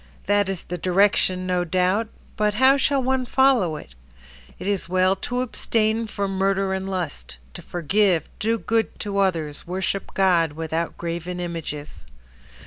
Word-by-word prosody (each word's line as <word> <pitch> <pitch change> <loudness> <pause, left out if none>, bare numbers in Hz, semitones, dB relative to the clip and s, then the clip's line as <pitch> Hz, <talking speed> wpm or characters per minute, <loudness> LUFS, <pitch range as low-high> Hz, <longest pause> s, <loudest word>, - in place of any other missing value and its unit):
That 205 -1 +2
is 190 -3 -3
the 180 0 -5
direction, 185 0 +2
no 180 -1 +1
doubt. 185 +5 +1 0.3
But 210 -1 +1
how 260 +4 +6
shall 275 -1 +1
one 260 0 +1
follow 250 -10 +3
it? 150 - -10 0.6
It - - -8
is 200 -3 -1
well 185 +1 +3
to 245 +5 -2
abstain 225 -2 0
from 195 -2 -3
murder 195 0 +1
and 190 0 -3
lust, 165 - -5 0.2
To - - -8
forgive, 180 0 +1
do 225 +2 +1
good 225 0 -1
to 200 -2 -2
others, 165 -7 -1
worship 190 +2 -3
God 175 -5 +3
Without 160 +1 -3
graven 170 +1 -4
images. 155 - -6
190 Hz, 150 wpm, -23 LUFS, 175-210 Hz, 0.6 s, how